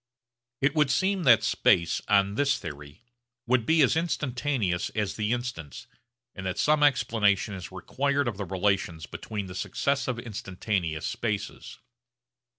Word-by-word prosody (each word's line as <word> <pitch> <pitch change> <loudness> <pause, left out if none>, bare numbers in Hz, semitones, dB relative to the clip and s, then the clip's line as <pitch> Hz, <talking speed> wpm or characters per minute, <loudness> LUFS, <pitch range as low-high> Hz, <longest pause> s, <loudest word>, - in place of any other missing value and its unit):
It 135 +1 +2
would 150 -3 +3
seem 185 +7 +1
that 115 -4 +6
space 85 -1 +2
on 100 -1 +3
this 140 +4 +1
theory 75 +3 -9 0.4
would 120 -2 +1
be 160 -1 +5
as 130 - +3
instantaneous 130 - -1
as 105 -2 -1
the 105 0 -1
instants, 120 - -4 0.5
and 95 - -8
that 95 - -3
some 150 0 +3
explanation 110 -8 +2
is 95 -2 -7
required 140 +9 -1
of 110 -5 -3
the 100 - -4
relations 95 -3 -1
between 105 +5 -6
the 90 - -8
successive 135 +6 -1
instantaneous 95 -7 -3
spaces. 105 -3 -4
110 Hz, 140 wpm, -27 LUFS, 95-135 Hz, 0.5 s, that